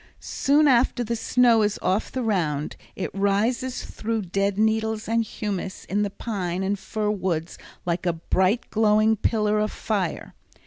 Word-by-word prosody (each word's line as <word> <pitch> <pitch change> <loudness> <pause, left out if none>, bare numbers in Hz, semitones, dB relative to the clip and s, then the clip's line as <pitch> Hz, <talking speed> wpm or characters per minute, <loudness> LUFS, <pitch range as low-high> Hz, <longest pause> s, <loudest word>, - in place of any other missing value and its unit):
Soon 295 +2 +2
after 245 -1 +3
the 235 0 -2
snow 235 0 +4
is 210 0 +1
off 190 +4 0
the 255 - -2
round 160 -9 -1 0.2
it 190 - -4
rises 220 +6 0
through 225 0 -3
the 190 - -9
dead 195 +1 0
needles 220 0 +1
and 230 +1 +2
humus 200 -3 -5
in 205 +2 -1
the 205 - 0
pine 190 -4 -3
and 200 +1 -1
fir 210 +1 -2
woods 175 -5 -2 0.3
like 175 +1 -1
a 175 - +2
bright 190 +7 0
glowing 215 0 +4
pillar 210 0 +1
of 215 0 0
fire. 195 -6 -3
210 Hz, 165 wpm, -24 LUFS, 190-225 Hz, 0.3 s, snow